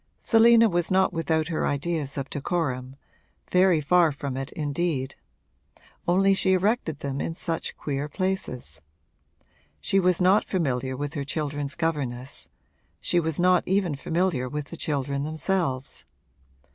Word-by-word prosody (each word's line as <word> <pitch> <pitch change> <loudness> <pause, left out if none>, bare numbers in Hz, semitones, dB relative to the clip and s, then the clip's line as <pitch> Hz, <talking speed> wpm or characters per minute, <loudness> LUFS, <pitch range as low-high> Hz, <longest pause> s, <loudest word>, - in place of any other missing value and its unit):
Selina 230 0 +6
was 175 -4 0
not 190 0 +3
without 160 -1 0
her 160 - 0
ideas 145 -1 -2
of 135 -1 -3
decorum 135 -4 -2 0.6
very 180 -2 +4
far 165 +2 +4
from 140 -2 -5
it 135 0 -4
indeed; 145 -3 -2 0.9
only 195 +3 +4
she 190 0 +2
erected 185 - 0
them 140 -1 -3
in 165 - -3
such 165 -1 -4
queer 145 0 -3
places. 185 - -3 1.0
She 195 - +1
was 180 -2 +2
not 190 +3 +4
familiar 130 -7 -1
with 145 +1 -4
her 140 - -3
children's 145 -1 -3
governess; 140 -6 -3 0.5
she 175 - +1
was 160 -1 -2
not 180 0 +4
even 190 -4 +1
familiar 155 -3 -1
with 150 +2 -5
the - - -5
children 140 -3 -2
themselves. 155 -2 -2
160 Hz, 135 wpm, -26 LUFS, 140-180 Hz, 1.0 s, Selina